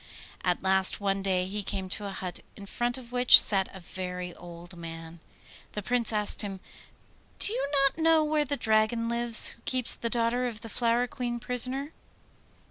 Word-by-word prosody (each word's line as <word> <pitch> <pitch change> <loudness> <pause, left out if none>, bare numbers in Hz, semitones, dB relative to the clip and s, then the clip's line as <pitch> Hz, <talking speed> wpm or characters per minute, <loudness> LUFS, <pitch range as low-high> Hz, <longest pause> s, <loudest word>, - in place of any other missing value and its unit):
At 180 0 -1
last 190 0 +3
one 195 -1 -1
day 185 -2 0
he 205 +3 -4
came 190 -1 -4
to 205 +2 0
a - - -5
hut, 185 -2 -5 0.2
in 200 - -11
front 240 +4 -2
of 245 -2 -12
which 245 0 +8
sat 195 -2 +1
a 190 - -11
very 180 0 -6
old 175 +1 -12
man. 165 0 -9 0.5
The 210 - -5
Prince 245 +1 +1
asked 210 -1 +2
him, 195 -2 -5 0.8
'Do 420 - -2
you - - -2 0.2
not 275 - 0
know 320 -1 +4
where 305 0 +1
the 285 0 -3
Dragon 220 +1 +1
lives 235 0 +5
who - - -15
keeps 255 -2 +1
the 230 - -4
daughter 240 +2 0
of 225 -2 -7
the 225 - -9
Flower 235 +2 +1
Queen 245 -3 -5
prisoner? 255 +4 -2
220 Hz, 185 wpm, -28 LUFS, 190-245 Hz, 0.8 s, which